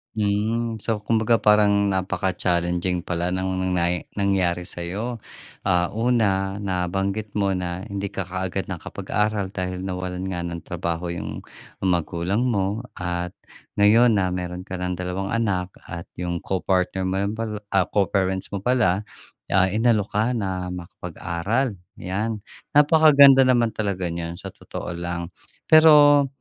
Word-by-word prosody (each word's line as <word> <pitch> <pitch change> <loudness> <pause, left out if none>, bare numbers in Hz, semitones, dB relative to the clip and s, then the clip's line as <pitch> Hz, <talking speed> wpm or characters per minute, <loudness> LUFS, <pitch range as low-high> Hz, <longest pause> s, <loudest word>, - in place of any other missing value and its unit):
Hmm. 110 +2 0
So, 110 0 -2
kumbaga 115 +1 +2
parang 100 -1 +4
napaka-challenging 90 -2 0
pala 85 +1 -2
ng 95 0 -1
nang 95 0 -1
nay 85 -1 0
nangyari 95 -3 +1
sa'yo. 95 +8 -4 0.5
Ah, 90 -2 +2
una 105 -4 +1
nabanggit 95 +2 -2
mo 100 -2 +1
na 90 0 -4
hindi 100 0 -4
ka 95 - -2
kaagad 95 +1 -4
nakapag-aral 100 +2 -2
dahil 90 -1 -4
nawalan 90 -1 -4
nga 85 -2 -3
ng 85 -1 -5
trabaho 85 +1 -3
yung 85 - -5 0.4
magulang 90 +4 0
mo. 105 0 -1
At 90 0 -3 0.4
ngayon 110 +4 +5
na 95 -3 +2
mayro'n 90 0 -4
ka 95 0 -6
ng 90 0 -2
dalawang 90 +3 -3
anak, 95 -5 -1
at 85 0 -8
'yong 85 -1 -4
co-partner 95 0 0
mo 95 - -1
lang 100 +2 -1
pala, 110 -1 -4 0.2
ah, 95 -2 +3
co-parents 95 -1 0
mo 100 - -3
pala, 110 -6 +2 0.5
ah, 95 -1 +4
inalok 110 -2 +2
ka 105 +2 +2
na 95 -3 -3
makapag-aral, 90 +6 -3 0.2
yan. 105 +4 -2 0.4
Napakaganda 145 -3 +7
naman 120 -4 +3
talaga 100 -4 -2
niyan, 85 0 -5
sa 95 -1 -9
totoo - - -7
lang. 85 0 -4 0.4
Pero, 150 -3 +7
95 Hz, 135 wpm, -23 LUFS, 90-105 Hz, 0.5 s, Napakaganda